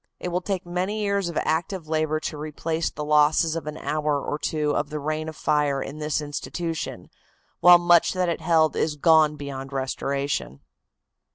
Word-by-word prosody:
It 180 - -4
will 180 +1 -1
take 190 -1 -3
many 185 +5 -2
years 200 -3 0
of 170 - -5
active 165 +1 -1
labor 155 0 0
to 155 - -4
replace 160 +2 -3
the 150 - -6
losses 150 +2 +3
of 165 -2 -5
an 150 0 -5
hour 150 -2 -1
or 145 +2 -4
two 150 -1 -1
of 145 - -1
the 150 0 -4
reign 155 +2 -3
of 160 - -9
fire 150 -3 +1
in 140 +3 -6
this 150 0 -1
institution, 160 +2 -5 0.5
while 175 0 +9
much 175 -1 +4
that 185 -1 0
it 170 -1 -2
held 160 -1 +3
is 155 -1 0
gone 155 0 +4
beyond 140 -2 -7
restoration. 135 - -3
155 Hz, 180 wpm, -24 LUFS, 150-170 Hz, 0.5 s, while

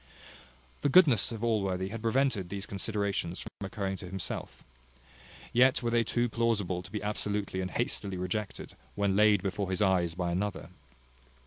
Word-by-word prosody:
The 145 - +2
goodness 140 - +6
of 115 -1 -5
Allworthy 95 -5 0
had 115 +2 -6
prevented 115 -5 +1
those 100 +1 -4
considerations 100 -3 -2
from - - -8 0.2
occurring 95 -1 -3
to 90 - -8
himself; 95 -1 -5 0.9
yet 130 +2 +4
were 120 - 0
they 115 0 +3
too 120 +2 0
plausible 110 -6 0
to 90 - -12
be 105 0 -4
absolutely 105 -2 -2
and 95 - -3
hastily 100 -4 -1
rejected, 95 +3 -4 0.2
when 100 -1 +1
laid 105 -2 +5
before 95 0 -2
his 95 - -1
eyes 90 -4 +2
by 90 -1 -1
another. 100 +4 -2
100 Hz, 155 wpm, -30 LUFS, 95-115 Hz, 0.9 s, goodness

